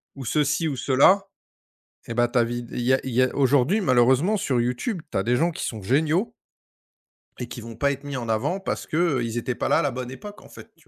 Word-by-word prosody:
ou 135 -2 -8
ceci 150 +5 +1
ou 145 - -2
cela, 140 +10 +4 0.9
eh 115 - -4
ben, 120 0 +3
ta 120 0 +2
vid 120 0 -5
il - - -3
y 125 +2 +2
a 130 - +2
il 130 - -4
y 125 +2 +3
a 130 - +1
aujourd'hui 140 - +3
malheureusement 130 - +3
sur 130 -8 0
YouTube, 125 - -2
tu - - -3
as - - +1
des 120 +4 +1
gens 165 +6 +2
qui - - -5
sont 110 - -5
géniaux 155 - +1 1.1
et 125 - -4
qui 120 - -8
vont 115 0 -9
pas 140 +5 +1
être 140 +1 -6
mis 145 -2 -5
en 115 -2 -5
avant 140 - 0
parce 195 - -4
qu'ils 135 -9 0
étaient 120 +1 -2
pas - - -2
là, - - +4
à - - +2
la 145 - 0
bonne 125 0 -6
époque, 205 +10 -10
en - - -16
fait, - - -14
tu - - -27
130 Hz, 250 wpm, -24 LUFS, 120-155 Hz, 1.1 s, cela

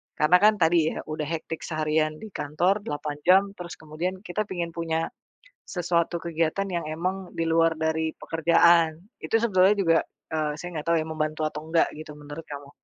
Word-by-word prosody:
Karena 165 +4 +5
kan 215 +1 +7
tadi 160 -1 +3
ya - - -5
udah 155 0 -3
hectic 160 0 -4
seharian 155 -1 0
di 220 - -8
kantor 180 +5 0
8 145 -2 -4
jam 190 +2 +7
terus 175 -1 -7
kemudian 170 +5 -4
kita 210 +2 -3
pingin 175 -3 -3
punya 165 -1 -2 0.6
sesuatu 175 -1 0
kegiatan 165 +3 -1
yang 170 -3 -2
emang 180 +4 -3
di 165 - 0
luar 165 0 +4
dari 160 0 0
pekerjaan. 165 0 +4 0.2
Itu 225 - +1
sebetulnya 195 -3 +4
juga, 165 -4 +4 0.4
eee, 155 -1 0
saya 175 +3 -6
nggak 150 - -8
tahu 170 0 +3
ya - - -4
membantu 155 0 -2
atau 150 - -7
enggak 165 0 +3
gitu 155 0 -9
menurut 150 +2 -9
kamu. 145 -1 -8
165 Hz, 180 wpm, -26 LUFS, 155-175 Hz, 0.6 s, kan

